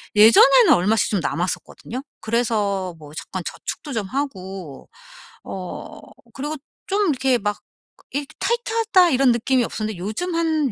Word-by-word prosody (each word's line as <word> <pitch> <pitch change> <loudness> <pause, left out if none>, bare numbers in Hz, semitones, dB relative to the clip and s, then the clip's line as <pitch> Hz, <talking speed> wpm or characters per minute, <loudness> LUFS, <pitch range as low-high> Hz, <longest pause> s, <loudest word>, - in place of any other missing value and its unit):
예전에는 230 +5 +7
얼마씩 205 +5 +2
좀 205 - +1
남았었거든요. 180 - -3 0.2
그래서 210 -5 0
뭐 150 -1 -12
잠깐 185 +2 -6
저축도 295 - -5
좀 215 -5 -2
하고 190 - -5 0.5
어 185 -2 -7 0.4
그리고 295 +3 -4 0.3
좀 400 -1 +1
이렇게 265 -3 +2
막 205 -1 -2 0.5
이렇게 285 +1 -3
'타이트하다.' 450 -6 +2
이런 260 -1 +4
느낌이 250 +2 +1
없었는데 215 -3 -4
요즘 220 - -3
한 315 -5 +1
235 Hz, 310 characters per minute, -22 LUFS, 195-290 Hz, 0.5 s, 예전에는